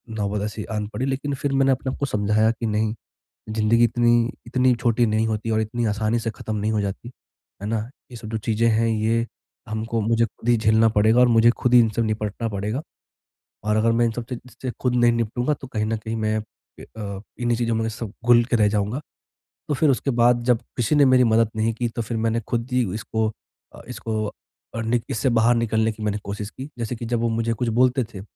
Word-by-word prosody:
नौबत 105 Hz, -1 st, -2 dB
ऐसी 105 Hz, 0 st, -4 dB
आन 105 Hz, -1 st, -2 dB
पड़ी 130 Hz, -, -2 dB
लेकिन 135 Hz, +1 st, -2 dB
फिर 140 Hz, +1 st, -2 dB
मैंने 135 Hz, 0 st, +3 dB
अपने 130 Hz, 0 st, -1 dB
आप -, -, -7 dB
को 140 Hz, -, 0 dB
समझाया 105 Hz, -2 st, +2 dB
कि 115 Hz, 0 st, -5 dB
नहीं, 110 Hz, 0 st, 0 dB, 0.6 s
ज़िन्दगी 110 Hz, +2 st, +3 dB
इतनी 120 Hz, 0 st, +3 dB, 0.2 s
इतनी 125 Hz, +1 st, +3 dB
छोटी 120 Hz, 0 st, +1 dB
नहीं 110 Hz, +1 st, +1 dB
होती 110 Hz, 0 st, -2 dB
और 110 Hz, 0 st, +2 dB
इतनी 115 Hz, +2 st, -2 dB
आसानी 110 Hz, +2 st, 0 dB
से 115 Hz, 0 st, -2 dB
खत्म 110 Hz, 0 st, -6 dB
नहीं 105 Hz, +1 st, -1 dB
हो 105 Hz, -, +1 dB
जाती, 100 Hz, +4 st, -4 dB, 0.5 s
है -, -, -3 dB
ना? 115 Hz, +1 st, 0 dB, 0.3 s
ये 120 Hz, -, -9 dB
सब 110 Hz, -1 st, -9 dB
जो 110 Hz, 0 st, -2 dB
चीज़ें 115 Hz, +2 st, +1 dB
हैं 115 Hz, 0 st, +2 dB
ये 115 Hz, +1 st, +1 dB, 0.4 s
हमको 110 Hz, +1 st, -2 dB
मुझे 115 Hz, +2 st, +2 dB
खुद 115 Hz, -, -7 dB
ही 120 Hz, -, +5 dB
झेलना 110 Hz, 0 st, +4 dB
पड़ेगा 110 Hz, +2 st, +3 dB
और 125 Hz, -, +6 dB
मुझे 115 Hz, 0 st, +5 dB
खुद 125 Hz, +1 st, 0 dB
ही 120 Hz, -, +9 dB
इनसे 115 Hz, 0 st, +1 dB
निपटना 110 Hz, +1 st, -2 dB
पड़ेगा, 105 Hz, +6 st, -3 dB, 0.8 s
और 105 Hz, 0 st, +1 dB
अगर 110 Hz, +1 st, +3 dB
मैं 120 Hz, +1 st, +2 dB
इन 115 Hz, -, +1 dB
सब 115 Hz, +1 st, -5 dB
से 125 Hz, -, -3 dB
ची 125 Hz, +1 st, -14 dB
से 130 Hz, -, -2 dB
खुद 125 Hz, -1 st, +1 dB
नहीं 120 Hz, -1 st, +4 dB
निपटूँगा 120 Hz, +4 st, 0 dB
तो 135 Hz, -, -8 dB
कहीं 110 Hz, -4 st, -2 dB
न 110 Hz, +1 st, -1 dB
कहीं 110 Hz, +1 st, -5 dB
मैं 110 Hz, -1 st, 0 dB
इ 110 Hz, -, -15 dB
अ, 100 Hz, -3 st, -5 dB, 0.2 s
इन्हीं 120 Hz, -1 st, +1 dB
चीज़ों 115 Hz, -1 st, 0 dB
में 110 Hz, 0 st, 0 dB
सब 110 Hz, -2 st, -7 dB
घुल 120 Hz, -1 st, +6 dB
के 120 Hz, -, 0 dB
रह 105 Hz, -2 st, +4 dB
जाऊँगा। 105 Hz, +6 st, -1 dB, 0.7 s
तो 150 Hz, -, 0 dB
फिर 150 Hz, +2 st, +2 dB
उसके 135 Hz, +1 st, +1 dB
बाद 120 Hz, 0 st, +3 dB
जब 120 Hz, -2 st, +3 dB, 0.2 s
किसी 120 Hz, +5 st, +1 dB
ने 145 Hz, -1 st, +6 dB
मेरी 130 Hz, -1 st, +5 dB
मदद 115 Hz, -1 st, +3 dB
नहीं 110 Hz, +1 st, 0 dB
की 120 Hz, +1 st, -2 dB
तो 115 Hz, -, -4 dB
फिर 115 Hz, +1 st, -3 dB
मैंने 115 Hz, +1 st, 0 dB
खुद 115 Hz, 0 st, -1 dB
ही 125 Hz, 0 st, +2 dB
इसको 110 Hz, 0 st, -1 dB, 0.5 s
अ, -, -, -11 dB
इसको 110 Hz, -3 st, -3 dB, 0.4 s
और 115 Hz, -, -2 dB
निक 115 Hz, 0 st, +1 dB
इससे 120 Hz, +4 st, 0 dB
बाहर 115 Hz, 0 st, +4 dB
निकलने 110 Hz, -1 st, +1 dB
की 110 Hz, 0 st, -9 dB
मैंने 105 Hz, -1 st, 0 dB
कोशिश 100 Hz, +1 st, -5 dB
की, 130 Hz, +6 st, -9 dB
जैसे 115 Hz, +1 st, -3 dB
कि 115 Hz, -, -6 dB
जब 120 Hz, 0 st, -1 dB
वो 115 Hz, -, +1 dB
मुझे 115 Hz, 0 st, 0 dB
कुछ 120 Hz, +2 st, -2 dB
बोलते 130 Hz, +1 st, +3 dB
थे, 110 Hz, -4 st, -9 dB
115 Hz, 235 wpm, -23 LUFS, 110-120 Hz, 0.8 s, ही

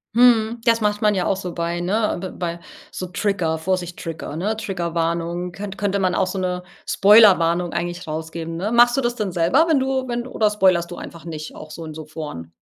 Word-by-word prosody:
Mhm, 235 Hz, -1 st, +4 dB
das 230 Hz, -1 st, +3 dB
macht 210 Hz, -1 st, 0 dB
man 210 Hz, -1 st, +3 dB
ja 185 Hz, -, 0 dB
auch -, -, +1 dB
so 180 Hz, -3 st, -5 dB
bei 170 Hz, 0 st, -2 dB
ne, 210 Hz, +5 st, 0 dB
b 190 Hz, -, -4 dB
bei 170 Hz, -1 st, -3 dB, 0.3 s
so 185 Hz, -, -5 dB
Trigger 180 Hz, -3 st, -1 dB
„Vorsicht 175 Hz, +1 st, -2 dB
Trigger“, 160 Hz, -3 st, -6 dB
ne, 200 Hz, +7 st, -1 dB
„Triggerwarnung“ 170 Hz, -3 st, -2 dB
könn 195 Hz, +1 st, -7 dB
könnte 200 Hz, 0 st, -1 dB
man 185 Hz, -2 st, +1 dB
auch 185 Hz, -, +1 dB
so 195 Hz, -, -4 dB
'ne 180 Hz, -1 st, -2 dB, 0.2 s
Spoilerwarnung 180 Hz, -5 st, +5 dB
eigentlich 175 Hz, +1 st, -3 dB
rausgeben, 160 Hz, +1 st, -5 dB
ne? 200 Hz, +6 st, -2 dB
Machst 240 Hz, +1 st, +5 dB
du 270 Hz, -, +1 dB
das 240 Hz, -1 st, -1 dB
denn 210 Hz, -5 st, -2 dB
selber, 175 Hz, -, +3 dB
wenn 315 Hz, -4 st, +3 dB
du 265 Hz, 0 st, -1 dB
wenn 240 Hz, 0 st, -3 dB
du -, -, -9 dB
oder 215 Hz, -4 st, +1 dB
spoilerst 185 Hz, -4 st, +2 dB
du 175 Hz, -, -7 dB
einfach 170 Hz, -1 st, -10 dB
nicht 155 Hz, -2 st, -7 dB
auch 155 Hz, -, -10 dB
so 165 Hz, +2 st, -8 dB
in 155 Hz, -1 st, -8 dB
so 155 Hz, 0 st, -7 dB
Foren? 150 Hz, -, -7 dB
180 Hz, 220 wpm, -21 LUFS, 170-210 Hz, 0.3 s, Spoilerwarnung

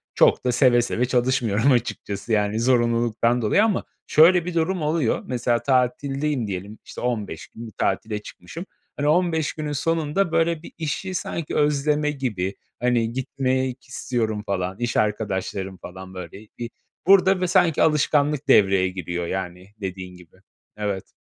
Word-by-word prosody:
çok -, -, +4 dB
da 125 Hz, -, +3 dB
seve 120 Hz, -1 st, +4 dB
seve 120 Hz, +1 st, 0 dB
çalışmıyorum 125 Hz, -1 st, +2 dB
açıkçası. 115 Hz, -3 st, -2 dB
Yani, 105 Hz, +1 st, +1 dB
zorunluluktan 120 Hz, -1 st, +2 dB
dolayı 120 Hz, -, +3 dB
ama 220 Hz, -3 st, +1 dB, 0.2 s
şöyle 170 Hz, +2 st, +6 dB
bir 180 Hz, -, -4 dB
durum 170 Hz, +2 st, 0 dB
oluyor. 150 Hz, -5 st, +1 dB
Mesela 120 Hz, -2 st, 0 dB
tatildeyim 135 Hz, +1 st, 0 dB
diyelim, 100 Hz, +2 st, -6 dB
işte, -, -, -9 dB
15 110 Hz, -9 st, -3 dB
gün 115 Hz, +1 st, -10 dB
bir -, -, -10 dB
tatile 110 Hz, -1 st, -1 dB
çıkmışım. 135 Hz, -, -9 dB, 0.3 s
Hani, 145 Hz, -, 0 dB
15 160 Hz, -1 st, +2 dB
günün 150 Hz, -1 st, -4 dB
sonunda, 165 Hz, +4 st, 0 dB
böyle, 165 Hz, -1 st, +1 dB
bir -, -, -10 dB
işi 165 Hz, +4 st, -3 dB
sanki 165 Hz, -2 st, -4 dB
özleme 150 Hz, 0 st, +2 dB
gibi, 105 Hz, -9 st, -3 dB, 0.2 s
hani, 120 Hz, -2 st, +1 dB
gitmek 130 Hz, 0 st, -1 dB
istiyorum 110 Hz, -4 st, -2 dB
falan, 95 Hz, -1 st, -2 dB
iş 120 Hz, 0 st, -1 dB
arkadaşlarım 95 Hz, -2 st, -1 dB
falan 95 Hz, +1 st, -10 dB
böyle 95 Hz, +3 st, -9 dB
bir 120 Hz, -1 st, -5 dB, 0.4 s
burada 190 Hz, -1 st, +5 dB
bö 180 Hz, -, +1 dB
sanki 170 Hz, -2 st, +3 dB
alışkanlık 150 Hz, -1 st, +2 dB
devreye 95 Hz, -6 st, +5 dB
giriyor, 85 Hz, -2 st, -4 dB
yani 90 Hz, 0 st, -5 dB
dediğin 95 Hz, -1 st, -6 dB
gibi, 90 Hz, -1 st, -18 dB, 0.4 s
evet. 100 Hz, -3 st, -4 dB
125 Hz, 145 wpm, -23 LUFS, 105-150 Hz, 0.4 s, şöyle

